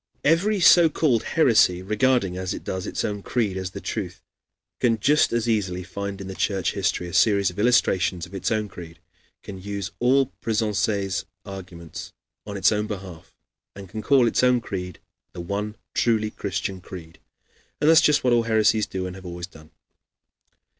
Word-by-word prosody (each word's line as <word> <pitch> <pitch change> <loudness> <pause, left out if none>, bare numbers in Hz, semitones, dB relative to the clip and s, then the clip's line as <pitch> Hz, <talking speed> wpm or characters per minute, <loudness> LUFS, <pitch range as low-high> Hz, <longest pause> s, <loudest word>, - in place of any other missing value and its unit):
Every 195 +7 +2
so 170 -1 +7
called 140 -7 +1 0.2
heresy, 110 - +4
regarding, 105 -1 +1
as 95 0 -3
it - - -8
does, 95 -1 -4
its - - -2
own 105 -1 -3
creed 105 -3 -1
as 95 -1 -3
the - - -8
truth, - - -5 0.6
can 115 -3 +2
just 150 +8 +3
as 120 0 0
easily 95 -5 -1
find 100 +2 -6
in 95 -1 -6
Church 95 -2 0
history 90 - -1
a 85 - -9
series 100 0 +3
of 90 - -10
illustrations 95 -6 +2
of - - -16
its 95 - -2
own 110 -1 0
creed, 85 -4 -11 0.5
can 95 -2 -9
use 100 -1 -5
all 130 +2 +2
Pressensé's 105 -3 -1 0.2
arguments 90 -4 -9 0.3
on 100 -1 -5
its 95 - +4
own 105 0 -1
behalf, 95 -3 -8 0.4
and 100 -1 -9
can 110 +3 -5
call 135 +1 +4
its - - +1
own 125 -1 +4
creed 90 -6 -6 0.4
the - - -8
one 100 +4 -4 0.2
truly 110 -2 +1
Christian 95 -2 -4
creed. 85 -3 -11 0.6
And 150 - +1
that - - +8
is 160 - +7
just 150 -1 +3
what 125 -1 +3
all 120 - +4
heresies 110 -1 +2
do 95 -1 -4
and 90 0 -6
have 95 -1 -12
always 85 0 -6
done. 80 -4 -17
100 Hz, 180 wpm, -24 LUFS, 95-115 Hz, 0.6 s, that